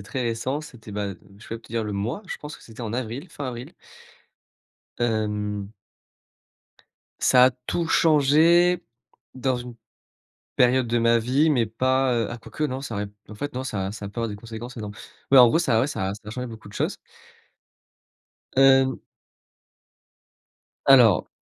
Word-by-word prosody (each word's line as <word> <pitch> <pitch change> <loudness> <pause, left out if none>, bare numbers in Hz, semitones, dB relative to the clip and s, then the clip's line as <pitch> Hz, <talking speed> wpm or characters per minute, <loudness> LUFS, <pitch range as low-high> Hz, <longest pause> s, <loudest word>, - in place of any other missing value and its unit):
c'est 100 - -11
très 130 +4 -3
récent. 120 +5 -2
C'était, 115 -7 -12
bah, 100 -1 -3 0.2
je - - -14
peux 115 - -4
même - - -14
te - - -17
dire 115 -1 0
le 105 - -4
mois, 110 - -3
je - - -5
pense 150 0 -9
que - - -19
c'était 115 +1 -11
en 110 - -4
avril, 125 +6 -4
fin 145 -4 -6
avril. 120 0 -8 1.2
Hem. 105 -3 -2 1.5
Ça 125 -1 +6
a - - +4
tout 125 +7 -3
changé 165 +3 +4 0.5
dans 130 0 0
une 120 0 -8 0.8
période 125 0 +4
de 120 +1 +1
ma 115 0 +4
vie, 135 +7 +2
mais 120 -6 +2
pas, 130 +4 +1
heu 115 -1 0
ah 120 - -6
quoique 155 +6 -5
non, 130 -2 -2
ça 135 -5 -6
aurait 105 0 -2
p - - -23 0.2
en 105 - -9
fait 145 +7 -5
non, 130 +1 -3
ça 95 -6 -3
ça 105 -1 -8
a 100 - -4
peu 115 - -6
avoir 115 - -1
des 105 - -6
conséquences 115 +3 -9
énormes, 105 -2 -6 0.4
mais 135 - +8
en 125 -1 +9
gros, 160 - +2
ça 115 -10 +2
ouais, 130 - +2
ça 95 -9 -2
ça 105 - -12
a - - -5
changé 125 +3 -5
beaucoup 110 -3 -10
de 100 - -13
choses. - - -1 1.6
Hem. 135 0 +5 1.8
Alors 125 -8 +6
120 Hz, 180 wpm, -24 LUFS, 110-135 Hz, 1.8 s, en